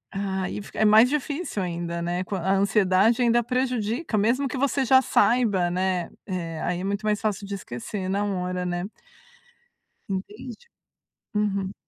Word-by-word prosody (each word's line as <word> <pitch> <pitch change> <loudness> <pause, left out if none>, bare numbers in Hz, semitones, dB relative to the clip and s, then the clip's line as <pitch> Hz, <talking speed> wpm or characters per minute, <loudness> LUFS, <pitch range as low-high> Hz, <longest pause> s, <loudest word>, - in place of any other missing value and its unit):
hã, 195 -1 -2
aí 185 - -4
fica 200 - -9
é 220 - +4
mais 220 +4 +7
difícil 295 - -2
ainda, 170 -1 -3
né, 175 +2 -1
quan 190 0 -4
a 190 +3 +1
ansiedade 200 +3 +3
ainda 240 0 +3
prejudica, 245 0 -1
mesmo 240 +7 +2
que 265 - -4
você 275 +1 +1
já 260 +2 +6
saiba, 220 -8 +2
né, 180 -1 -1 0.2
eh, 170 -4 -4
aí 175 0 -1
é - - -4
muito 200 +2 -2
mais 210 -1 +1
fácil 210 -2 -2
de 200 - -6
esquecer 185 - -5
na 200 +2 0
hora, 180 -2 -2
né. 175 0 -2 1.2
Entendi, 210 +6 -5 0.8
uhum. 200 -2 0
200 Hz, 160 wpm, -25 LUFS, 185-235 Hz, 1.2 s, mais